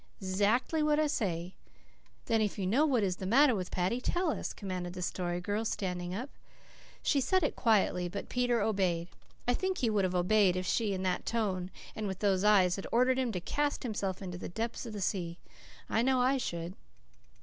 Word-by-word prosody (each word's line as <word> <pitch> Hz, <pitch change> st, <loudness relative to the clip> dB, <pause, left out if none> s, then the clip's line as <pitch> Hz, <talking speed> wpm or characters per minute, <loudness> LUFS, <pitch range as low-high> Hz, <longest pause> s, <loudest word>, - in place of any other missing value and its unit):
"'Zackly 205 Hz, -, +1 dB
what 300 Hz, 0 st, +3 dB
I 310 Hz, -, +3 dB
say." 185 Hz, -, -2 dB, 0.7 s
"Then, 225 Hz, -2 st, +2 dB
if 210 Hz, -1 st, -1 dB
you 195 Hz, -, -2 dB
know 260 Hz, +12 st, +3 dB
what 250 Hz, -7 st, +2 dB
is 185 Hz, -2 st, 0 dB
the 190 Hz, -, -4 dB
matter 265 Hz, +5 st, +5 dB
with 185 Hz, -4 st, -3 dB
Paddy, 190 Hz, +7 st, -1 dB
tell 350 Hz, +4 st, 0 dB
us," -, -, -3 dB
commanded 185 Hz, -3 st, -5 dB
the 180 Hz, 0 st, -5 dB
Story 175 Hz, -1 st, -2 dB
Girl, 205 Hz, +4 st, -2 dB
standing 180 Hz, -5 st, -3 dB
up. 255 Hz, +7 st, -5 dB, 0.7 s
She 280 Hz, -, +2 dB
said 370 Hz, +8 st, +2 dB
it 300 Hz, -, 0 dB
quietly; 195 Hz, -6 st, +2 dB
but 200 Hz, -, -5 dB
Peter 245 Hz, -2 st, +1 dB
obeyed. 185 Hz, -5 st, 0 dB, 0.4 s
I 245 Hz, -, +4 dB
think 375 Hz, +7 st, -1 dB
he 235 Hz, -3 st, +1 dB
would 205 Hz, -2 st, +2 dB
have 185 Hz, -1 st, 0 dB
obeyed 185 Hz, +1 st, +4 dB
if 185 Hz, 0 st, -2 dB
she, 210 Hz, +2 st, +1 dB
in 185 Hz, -, -3 dB
that 185 Hz, -1 st, -1 dB
tone 190 Hz, -6 st, -1 dB, 0.3 s
and 215 Hz, -1 st, -3 dB
with 190 Hz, -1 st, -3 dB
those 195 Hz, -1 st, +1 dB
eyes, 195 Hz, -4 st, +5 dB
had 195 Hz, -, -5 dB
ordered 255 Hz, +2 st, +3 dB
him 250 Hz, -3 st, 0 dB
to 180 Hz, -, -1 dB
cast 290 Hz, +11 st, -1 dB
himself 200 Hz, -5 st, -3 dB
into 180 Hz, -2 st, -6 dB
the -, -, -6 dB
depths 230 Hz, +5 st, -4 dB
of 225 Hz, -, -7 dB
the 205 Hz, -, -5 dB
sea. 175 Hz, -3 st, -2 dB, 0.5 s
I 225 Hz, -, +1 dB
know 260 Hz, +1 st, +3 dB
I 260 Hz, +2 st, +3 dB
should. 170 Hz, -7 st, -4 dB
205 Hz, 205 wpm, -31 LUFS, 185-245 Hz, 0.7 s, matter